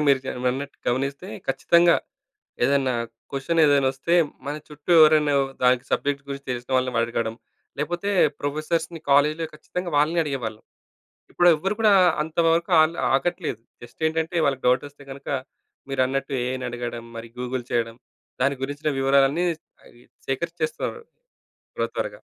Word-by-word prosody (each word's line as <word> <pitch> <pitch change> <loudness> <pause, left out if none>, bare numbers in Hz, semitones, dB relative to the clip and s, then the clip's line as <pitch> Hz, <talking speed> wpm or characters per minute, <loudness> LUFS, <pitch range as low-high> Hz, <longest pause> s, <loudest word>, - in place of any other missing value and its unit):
మీరు 135 -2 +4
జ - - -9 0.2
అన్నట్టు 140 +3 -5
గమనిస్తే 135 +3 -1 0.2
ఖచ్చితంగా 170 +6 +4 0.7
ఏదైనా 135 -1 +2 0.4
క్వెషన్ 150 +5 0
ఏదైనా 140 -2 +4
వస్తే, 170 +6 -1 0.3
మన 145 - -2
చుట్టూ 150 +2 -8
ఎవరొనొ 155 -2 +5 0.3
దానికి 125 0 +4
సబ్జెక్ట్ 140 0 0
గురించి 140 0 -6
తెలిసిన 125 +1 -5
వాళ్ళని 125 -2 0
అడగడం. 115 -1 -2 0.4
లేకపోతే 175 +6 -2 0.3
ప్రొఫెసర్స్‌‌ని 155 +3 -2
కాలేజ్‌‌లో 150 +3 +3
ఖచ్చితంగా 180 +3 -5
వాళ్ళనే 155 +4 +3
అడిగేవాళ్ళం. 120 -7 -4 0.7
ఇప్పుడు 175 - +3
ఎవ్వరూ 195 +7 -2
కూడా 215 -2 +5 0.3
అంతవరకు 165 +2 +1
ఆన్ల 155 +2 +2 0.2
ఆగట్లేదు. 165 - -2 0.2
జస్ట్ 120 +6 -10
ఏంటంటే, 160 +2 -2
వాళ్ళకి 135 -2 0
డౌట్ 125 +3 +3
వస్తే 145 0 -17
గనక 135 +1 -11 0.6
మీరన్నట్టు 135 +1 0
ఏఐని 130 0 -3
అడగడం. 120 -1 -5
మరి 115 0 -8
గూగుల్ 125 0 -3
చేయడం. 115 -1 -1 0.5
దాని 140 +1 +2
గురించిన 145 +2 -2
వివరాలన్నీ 135 +5 +3 0.4
అవి 120 - -19 0.3
సేకరించేస్తున్నరు 170 - -3 0.7
త్వరత్వరగా. - - -3
140 Hz, 130 wpm, -24 LUFS, 130-160 Hz, 0.7 s, ఎవరొనొ